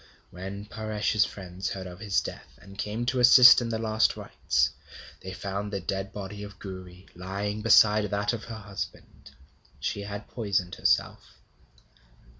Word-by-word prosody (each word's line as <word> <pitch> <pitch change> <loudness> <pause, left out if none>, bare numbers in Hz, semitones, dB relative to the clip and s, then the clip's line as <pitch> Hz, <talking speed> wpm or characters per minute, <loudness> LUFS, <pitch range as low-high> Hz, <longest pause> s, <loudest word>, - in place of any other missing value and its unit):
When 95 +3 -7
Paresh's 110 -1 0
friends 95 -1 -6
heard 95 -1 -6
of 90 0 -9
his 105 -2 +1
death, - - -9
and 100 - -14
came 105 +4 -3
to 130 +1 0
assist 125 +1 +9
in 120 - -3
the 115 - -1
last 110 0 +1
rites, 65 0 0 0.5
they 95 - -8
found 100 +2 -4
the 100 - -2
dead 95 +2 -4
body 100 0 -7
of 105 0 -9
Gouri 95 -1 -10
lying 100 +4 -4
beside 105 -1 +5
that 105 +1 -1
of 115 - -5
her 115 - -7
husband. 100 -2 -8 0.5
She 100 - -3
had 100 +1 -7
poisoned 100 -6 -2
herself. - - 0
100 Hz, 155 wpm, -27 LUFS, 95-110 Hz, 0.5 s, assist